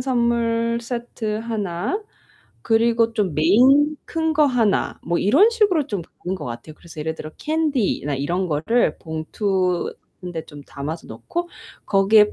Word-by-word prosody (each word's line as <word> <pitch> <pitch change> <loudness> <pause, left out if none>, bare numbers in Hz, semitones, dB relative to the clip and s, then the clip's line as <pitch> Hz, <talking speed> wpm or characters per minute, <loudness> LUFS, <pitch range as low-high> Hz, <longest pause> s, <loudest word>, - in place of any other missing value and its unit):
선물 235 -2 +1
세트 235 -3 -4
하나, 220 - -2 0.6
그리고 230 0 +3
좀 200 -6 0
메인 260 - +5
큰 320 -1 -1
거 305 - +5
하나, 235 -6 +1
뭐 170 +1 0
이런 290 - +5
식으로 405 - +2
좀 205 -10 -3 0.2
보는 185 +2 -1
것 - - -7
같아요. 120 +6 -7
그래서 160 -1 -11
예를 160 +1 -2
들어 155 -1 -8
캔디나 290 - 0
이런 175 +7 -1
거를 165 +11 +1
봉투에 180 +3 -1 0.5
좀 145 -2 -11
담아서 150 +5 -6
넣고 345 - -5 0.4
거기에 210 +1 +5
220 Hz, 270 characters per minute, -22 LUFS, 170-250 Hz, 0.6 s, 메인